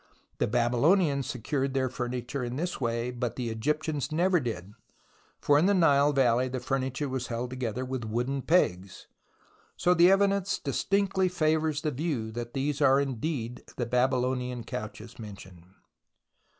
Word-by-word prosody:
The - - +2
Babylonians 140 - +2
secured 135 +2 -2
their 130 -1 +2
furniture 125 +1 -4
in 120 0 -4
this 175 +1 -3
way, 120 0 -1
but 120 -1 -3
the 120 -3 -3
Egyptians 150 +4 -2
never 175 +3 +3
did, 105 - -5 0.7
for 145 0 +4
in 170 - +3
the 200 - +4
Nile 145 -5 +4
valley 130 -2 +3
the 130 0 -3
furniture 130 +2 -2
was 130 -2 -3
held 120 +1 -4
together 125 -1 -3
with 130 -2 -4
wooden 125 +5 -1
pegs; 95 - +1 0.7
so 180 - +3
the 175 +1 +6
evidence 195 0 +2
distinctly 190 +6 0
favours 155 -3 +1
the 155 - 0
view 135 -6 -2
that 120 +2 -6
these 140 +2 -1
are 135 -1 +5
indeed 130 -2 -3
the 120 - -1
Babylonian 125 0 0
couches 105 +2 -7
mentioned. 95 -5 -11
130 Hz, 150 wpm, -28 LUFS, 120-150 Hz, 0.7 s, the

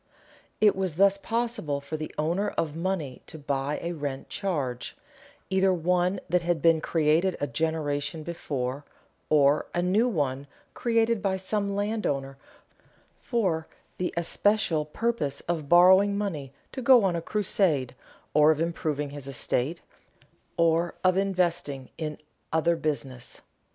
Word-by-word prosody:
It 210 -1 +5
was 190 -4 -2
thus 200 +2 +4
possible 225 -10 -2
for 140 +2 -6
the 155 0 -5
owner 170 +7 0
of 155 -2 -1
money 165 -7 -3
to 160 - -8
buy 140 0 -2
a 170 - -2
rent 145 -5 -5
charge, 145 -12 -3 0.5
either 190 0 +3
one 180 +2 +1
that 180 +1 +2
had 170 -1 0
been 165 -1 +4
created 165 +4 +2
a - - 0
generation 155 -1 -2
before, 140 -5 -4 0.5
or 145 -1 +4
a 175 - +1
new 205 +7 +3
one 145 - -1 0.3
created 230 -2 +1
by 190 -1 0
some 200 +1 -2
landowner 145 -11 -2 0.8
for 185 -9 -1 0.3
the 180 - -1
especial 170 -2 +1
purpose 155 -4 -2
of 160 -4 -3
borrowing 190 +3 +6
money 160 -10 -3 0.2
to 260 - -5
go 245 -2 +6
on 185 -3 +2
a 170 - -2
crusade 165 - 0 0.4
or 150 0 +6
of 155 -1 +3
improving 155 -3 -2
his 145 -2 -8
estate 140 +3 -2 0.8
or 170 +1 +2
of 185 -1 +4
investing 175 -8 -1
in 155 -2 -3 0.3
other 165 +1 +2
business. 140 -6 -4
165 Hz, 135 wpm, -27 LUFS, 145-190 Hz, 0.8 s, borrowing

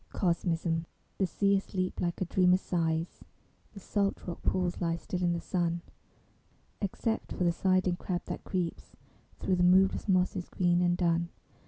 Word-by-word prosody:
COSMISM 170 -2 0 0.3
The 190 - +2
sea 200 +2 +2
asleep 185 -1 -3
like 175 -1 -1
a - - +2
dreamer 180 +1 +4
sighs; 165 -2 -2 0.5
The 200 - -9
salt 200 +1 -1
rock 175 - -6
pools 180 -1 0
lie 165 -1 +1
still 180 +2 -4
in 175 -1 +2
the 170 - -1
sun, 170 -1 -1 1.0
Except 220 +3 -2
for - - -1
the 175 - +4
sidling 185 0 +1
crab 180 -1 -3
that - - -5
creeps 180 -4 -3 0.4
Thro 190 - 0
the 180 - +2
moveless 185 +3 +4
mosses 180 -1 +1
green 175 -1 +2
and 175 0 +2
dun. 170 -1 +1
180 Hz, 160 wpm, -30 LUFS, 170-185 Hz, 1.0 s, dreamer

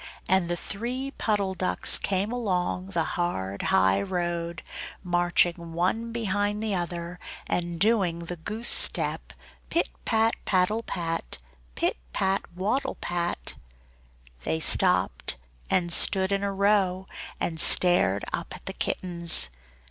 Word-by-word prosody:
and 185 -2 +1
the 175 - -2
three 245 +9 -5
Puddle 200 -3 -1
Ducks 185 0 +2
came 195 +2 -1
along 185 -6 -2
the 175 -4 -1
hard 100 - -3
high 95 +1 +2
road, 170 - -4 0.4
marching 175 -1 0
one 205 +7 -1
behind 205 -2 -2
the 215 -2 -2
other 175 0 -4 0.3
and 170 -1 -3
doing 185 -5 +1
the 175 +1 -6
goose 215 +8 -5
step - - +4 0.4
pit 340 - -1
pat 225 0 +1
paddle 190 +4 +1
pat! 165 -6 -5 0.4
pit - - -1 0.2
pat 190 +1 0
waddle 215 +9 -2
pat! 175 - -3 0.9
They 80 +3 -2
stopped - - +3 0.3
and 175 -2 0
stood 190 +1 +4
in 195 0 0
a 200 - -1
row, 195 -2 +1 0.3
and 160 -2 -2
stared 170 - +6
up - - -5
at - - -14
the - - -5
kittens. 170 - +2
180 Hz, 125 wpm, -26 LUFS, 170-205 Hz, 0.9 s, stared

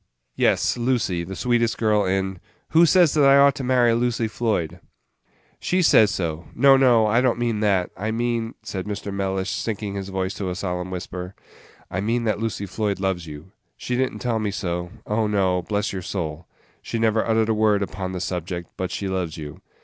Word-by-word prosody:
"Yes, - - +2
Lucy; 120 -8 0
the 95 +3 -7
sweetest 120 0 +1
girl 105 -2 +2
in 95 0 -1 0.2
" - - -41
"Who 165 +2 +6
says 175 -3 +5
that 150 - +3
I 135 0 +7
ought 140 0 +6
to 135 - -6
marry 125 -2 +3
Lucy 120 -1 0
Floyd?" 90 -7 -2 0.8
"She 185 0 +1
says 110 -9 +6
so 85 -5 -3
no, 135 +2 +6
no, 125 -4 +5
I 110 +3 +3
don't 125 -3 +2
mean 120 -3 -1
that; 100 -4 +1
I 105 +4 -3
mean," 115 0 -1
said 95 0 -5
Mr. 105 -1 -4
Mellish, 95 -1 -2
sinking 105 -2 -3
his 100 -1 -5
voice 95 0 -2
to 95 -2 -3
a 90 - -3
solemn 90 -2 -3
whisper, 90 0 -6 0.6
"I 95 - -2
mean 115 +3 0
that 110 -2 0
Lucy 110 -2 -3
Floyd 100 0 -2
loves 95 -3 -2
you! 75 +4 -10 0.3
She 125 - -3
did 130 +1 +1
n't - - -9
tell 120 -2 0
me 105 -1 -1
so 90 -3 -3 0.2
oh, 105 +1 0
no, 95 -3 +1
bless 105 +3 -2
your 95 - -4
soul! 85 -3 -5 0.3
she - - -4
never 110 -1 +2
uttered 110 -1 +1
a - - +3
word 105 -2 +2
upon 95 -1 -5
the 95 - -4
subject; 90 -1 -4
but 95 -1 -2
she 100 +1 -4
loves 90 -4 -3
you. 75 -2 -8
105 Hz, 205 wpm, -23 LUFS, 95-115 Hz, 0.8 s, I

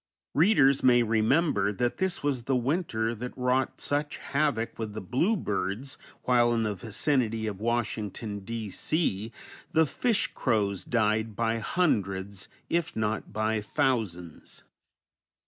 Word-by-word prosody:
Readers 145 -5 +5
may 120 -1 +5
remember 110 - +2
that 120 +4 -1
this 190 -4 -1
was 135 -5 -1
the 135 - +1
winter 125 -4 0
that 125 +3 -7
wrought 125 +1 0
such 145 +1 -1
havoc 140 -7 -1
with 110 -2 -4
the 110 - -4
blue 150 - +1
birds, 105 - -2 0.3
while 120 -1 +4
in 115 -1 +1
the 105 -1 0
vicinity 115 - 0
of 105 -3 -4
Washington, 110 -2 -2
D. 110 0 -5
C., 115 - 0 0.4
the 160 0 +5
fish 225 - 0
crows 100 -6 0
died 110 -1 0
by 115 0 0
hundreds, 100 - -1 0.2
if 170 -1 -1
not 110 0 -2
by 110 0 0
thousands. 105 - -2
115 Hz, 130 wpm, -28 LUFS, 105-135 Hz, 0.4 s, Readers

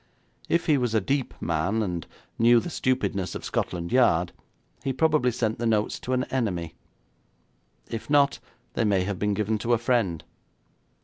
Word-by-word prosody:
If 170 - +2
he 150 -4 +3
was 120 -3 0
a - - +5
deep 135 +6 -1
man, 85 +7 0
and 90 -4 -4 0.3
knew 120 +1 +6
the 175 - -5
stupidness 125 - -1
of - - -6
Scotland 85 -1 -2
Yard, 90 -9 +3 0.5
he 135 - 0
probably 155 -3 +3
sent 115 -2 -1
the 120 - 0
notes 105 -2 +1
to 130 - -3
an 125 0 +1
enemy. 90 -11 -1 1.1
If 115 +3 -6
not, 140 -1 +3 0.3
they - - 0
may 100 -4 +2
have 95 0 -3
been 105 -1 0
given 105 +1 0
to 120 +3 +1
a - - +4
friend. 110 -9 0
115 Hz, 170 wpm, -26 LUFS, 95-125 Hz, 1.1 s, knew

